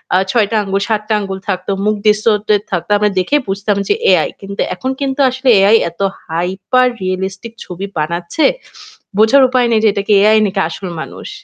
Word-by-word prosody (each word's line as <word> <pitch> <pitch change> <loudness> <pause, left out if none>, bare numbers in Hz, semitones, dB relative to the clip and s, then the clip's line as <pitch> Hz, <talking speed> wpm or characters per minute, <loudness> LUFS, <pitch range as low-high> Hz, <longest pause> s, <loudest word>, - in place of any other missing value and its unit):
আ - - +5
৬টা 220 -1 +1
আঙুল, 195 0 -2
৭টা 215 0 -1
আঙুল 195 -1 -5
থাকত, 185 -1 -3 0.2
মুখ 215 0 +2
distorted 210 -1 +2
থাকতো। 175 +2 -3
আমরা 210 0 +1
দেখে 185 +11 0
বুঝতাম 200 +1 -1
যে 415 - +2 0.2
এআই, - - +3
কিন্তু 200 0 -5
এখন 260 +8 -3
কিন্তু 270 0 -2
আসলে 260 +1 -1
এআই 210 +3 +5
এত 170 +4 -12 0.3
হাইপার 190 +9 0
রিয়ালিস্টিক 190 +4 -4
ছবি 185 +2 -6
বানাচ্ছে, 170 - -1 0.7
বোঝার 225 +6 +5
উপায় 250 -2 +2
নেই 220 -1 +2
যে 215 - +5
এটা 200 -1 -2
কি 210 - +3
এআই 215 +1 +5
নাকি 195 0 -3
আসল 185 +3 -7
মানুষ। - - -9
205 Hz, 180 wpm, -15 LUFS, 190-225 Hz, 0.7 s, আ